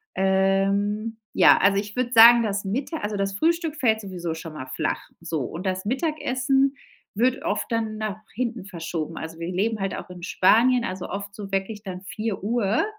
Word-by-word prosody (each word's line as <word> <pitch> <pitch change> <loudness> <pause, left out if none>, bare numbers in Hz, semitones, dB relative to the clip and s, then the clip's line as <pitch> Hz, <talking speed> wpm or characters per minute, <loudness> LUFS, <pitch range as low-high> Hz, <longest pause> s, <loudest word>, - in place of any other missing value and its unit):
Ähm, 195 +3 +1 0.2
ja, - - +7
also, 195 0 +4
ich 210 +2 -3
würde 250 -1 0
sagen, 235 +1 +9
das 205 -1 -1
Mitta 270 - -2
also, 205 0 -3
das 195 0 -1
Frühstück 330 - +1
fällt 220 -6 +2
sowieso 175 -4 -4
schon 160 -1 -8
mal 130 -4 -7
flach, 130 - -2 0.2
so, 165 -3 -3
und 170 +9 -6
das 185 0 -1
Mittagessen 270 0 +1 0.4
wird 255 +3 +1
oft - - -2
dann 220 -1 -1
nach 215 -1 -3 0.2
hinten 235 -4 -3
verschoben, 165 -4 -5
also, 160 +1 -7
wir 170 +2 -4
leben 210 +4 0
halt 195 - -1
auch - - -8
in 180 -1 -10
Spanien, 235 +7 +4
also, 185 0 -5
oft 200 0 -6
so 200 -2 -8
wirklich 205 +2 -2
dann 185 -2 -6
16:00, 215 - -1
205 Hz, 180 wpm, -24 LUFS, 185-235 Hz, 0.4 s, sagen